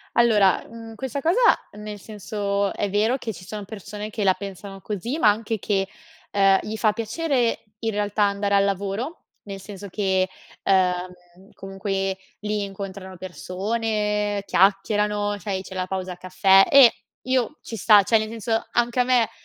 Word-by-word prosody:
Allora, 210 Hz, -5 st, +4 dB
mhmm, 225 Hz, -1 st, -10 dB
questa 265 Hz, +3 st, -4 dB
cosa 335 Hz, -, +2 dB, 0.4 s
nel 210 Hz, 0 st, -8 dB
senso, 200 Hz, -1 st, -2 dB
è 205 Hz, -, -2 dB
vero 215 Hz, +6 st, +2 dB
che 235 Hz, -4 st, -5 dB
ci 180 Hz, 0 st, -12 dB
sono 210 Hz, +2 st, -6 dB
persone 210 Hz, +1 st, -7 dB
che 215 Hz, -1 st, -3 dB
la 190 Hz, -1 st, +5 dB
pensano 195 Hz, 0 st, -8 dB
così, 220 Hz, -, -4 dB
ma 215 Hz, -, +6 dB
anche 220 Hz, +1 st, -1 dB
che, 195 Hz, -1 st, 0 dB, 0.4 s
ehm, 195 Hz, -1 st, +4 dB
gli 220 Hz, +1 st, -5 dB
fa 215 Hz, -1 st, +2 dB
piacere 240 Hz, +2 st, -1 dB, 0.2 s
in 225 Hz, -1 st, -1 dB
realtà 205 Hz, 0 st, 0 dB
andare 200 Hz, 0 st, +1 dB
al 200 Hz, -, +5 dB
lavoro, 200 Hz, -, -3 dB, 0.2 s
nel 195 Hz, -1 st, -7 dB
senso 200 Hz, 0 st, -9 dB
che, 190 Hz, -1 st, +1 dB, 0.4 s
ehm, 180 Hz, 0 st, -1 dB
comunque 195 Hz, 0 st, -3 dB, 0.2 s
lì 210 Hz, -1 st, -2 dB
incontrano 195 Hz, -1 st, -7 dB
persone, 210 Hz, +3 st, -2 dB
chiacchierano, 205 Hz, +2 st, +2 dB
c'è 200 Hz, +1 st, -6 dB
i 190 Hz, -1 st, -1 dB
c'è 190 Hz, 0 st, -10 dB
la 185 Hz, -1 st, -1 dB
pausa 185 Hz, -1 st, -4 dB
caffè 190 Hz, +1 st, +5 dB
e 275 Hz, -4 st, +8 dB, 0.3 s
io 255 Hz, +3 st, 0 dB
ci 230 Hz, -, -7 dB
sta, 210 Hz, 0 st, +6 dB
cioè, 225 Hz, +4 st, +4 dB
nel 215 Hz, 0 st, -2 dB
senso 225 Hz, 0 st, -2 dB
anche 240 Hz, +1 st, +1 dB
a -, -, +6 dB
me 245 Hz, -2 st, +3 dB
205 Hz, 165 wpm, -23 LUFS, 195-220 Hz, 0.4 s, e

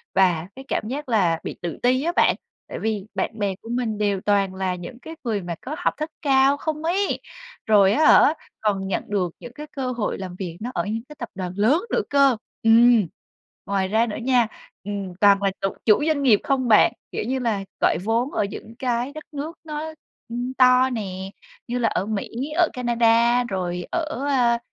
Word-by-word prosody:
và 180 Hz, -3 st, +3 dB
cái 265 Hz, 0 st, -10 dB
cảm 215 Hz, -, -2 dB
giác 275 Hz, +2 st, -5 dB
là 175 Hz, -7 st, +2 dB
bị -, -, -5 dB
tự 170 Hz, -1 st, -4 dB
ti 255 Hz, +3 st, +3 dB
á 340 Hz, -, +1 dB
bạn, -, -, +4 dB, 0.3 s
tại -, -, -6 dB
vì 215 Hz, -3 st, -2 dB
bạn 220 Hz, -, -2 dB
bè 200 Hz, -2 st, 0 dB
của 225 Hz, -, -11 dB
mình 240 Hz, -3 st, -1 dB
đều 205 Hz, -2 st, 0 dB
toàn 200 Hz, -2 st, +1 dB
là 190 Hz, -1 st, -1 dB
những 180 Hz, +7 st, -9 dB
cái 320 Hz, +5 st, -9 dB
người 220 Hz, -5 st, -1 dB
mà 175 Hz, -1 st, -5 dB
có 290 Hz, +4 st, -5 dB
học 355 Hz, -, 0 dB
thức 305 Hz, +1 st, -3 dB
cao 275 Hz, -1 st, +4 dB
không 310 Hz, +1 st, -3 dB
ấy, 375 Hz, +5 st, 0 dB, 0.5 s
rồi 200 Hz, -3 st, +5 dB
á 310 Hz, +5 st, +3 dB
hả 300 Hz, -, +7 dB, 0.3 s
còn 195 Hz, -3 st, 0 dB
nhận 195 Hz, -, -1 dB
được 185 Hz, -5 st, -1 dB
những 245 Hz, -, -10 dB
cái 300 Hz, +2 st, -8 dB
cơ 260 Hz, -2 st, -2 dB
hội 235 Hz, -4 st, -2 dB
làm 185 Hz, -2 st, -7 dB
việc 175 Hz, -3 st, -5 dB
nó 240 Hz, +3 st, -5 dB
ở -, -, -1 dB
những 225 Hz, +2 st, -3 dB
cái 300 Hz, -, -10 dB
tập 235 Hz, -, -5 dB
đoàn 185 Hz, -1 st, -4 dB
lớn 245 Hz, -, +3 dB
nữa -, -, +2 dB
cơ. 275 Hz, -4 st, +4 dB, 0.3 s
Ừm. 225 Hz, -2 st, +6 dB, 0.6 s
Ngoài 195 Hz, -2 st, 0 dB
ra 220 Hz, +4 st, +2 dB
nữa 210 Hz, -, -4 dB
nha, 245 Hz, -2 st, +3 dB, 0.4 s
ừm, 200 Hz, -2 st, -5 dB
toàn 200 Hz, -1 st, +5 dB
là 195 Hz, -, +2 dB
chụ 195 Hz, -, +1 dB, 0.2 s
chủ 215 Hz, +5 st, +5 dB
doanh 305 Hz, -3 st, +1 dB
nghiệp 225 Hz, -7 st, +5 dB
không 265 Hz, -2 st, 0 dB
bạn, 215 Hz, -2 st, +6 dB, 0.2 s
kiểu -, -, -3 dB
như 260 Hz, +1 st, -1 dB
là, 220 Hz, -5 st, -1 dB, 0.2 s
gọi -, -, +3 dB
vốn 235 Hz, +5 st, +1 dB
ở -, -, 0 dB
những 220 Hz, +3 st, -9 dB
cái 245 Hz, 0 st, -1 dB
đất 310 Hz, 0 st, -8 dB
nước 300 Hz, +3 st, -5 dB
nó, 315 Hz, 0 st, -5 dB, 0.4 s
ưm, 245 Hz, +2 st, -3 dB
to 255 Hz, 0 st, +5 dB
nè, 190 Hz, -5 st, -4 dB, 0.4 s
như 245 Hz, +1 st, -2 dB
là 230 Hz, -, +2 dB
ở -, -, -1 dB
Mỹ, 210 Hz, -2 st, -3 dB, 0.3 s
ở 350 Hz, -2 st, +5 dB
Canada, 235 Hz, 0 st, +3 dB
rồi 180 Hz, -5 st, -3 dB
ở, 310 Hz, -5 st, -2 dB
a, 240 Hz, -4 st, +3 dB
230 Hz, 210 wpm, -23 LUFS, 200-265 Hz, 0.6 s, hả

